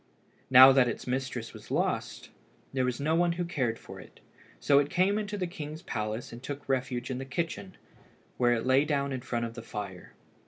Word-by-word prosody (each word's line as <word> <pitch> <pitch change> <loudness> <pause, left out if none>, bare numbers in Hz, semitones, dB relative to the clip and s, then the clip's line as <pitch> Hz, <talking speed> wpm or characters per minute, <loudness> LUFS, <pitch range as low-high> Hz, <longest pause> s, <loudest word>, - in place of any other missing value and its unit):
Now 130 +1 +10
that 130 -2 +4
its 120 - -4
mistress 125 -2 -3
was - - -12
lost, - - -2 0.4
there 130 -1 +1
was 125 -1 -2
no 155 +3 0
one 170 +1 +3
who 175 +1 -2
cared 130 -9 -1
for - - -11
it, - - -15 0.4
so 140 -1 +4
it 145 0 0
came 195 +4 +2
into 210 0 -4
the 185 - -1
king's 155 -1 -7
palace 110 - -4
and 120 - -9
took 145 +2 -7
refuge 130 -1 -1
in 130 - -3
the - - -4
kitchen, 170 +7 -4 0.6
where 120 -1 +3
it 115 0 -1
lay 130 +2 +4
down 140 -2 -1
in 130 - -4
front 120 -1 -2
of 115 - -6
the 115 - -8
fire. 100 -5 -7
130 Hz, 205 wpm, -29 LUFS, 120-155 Hz, 0.6 s, Now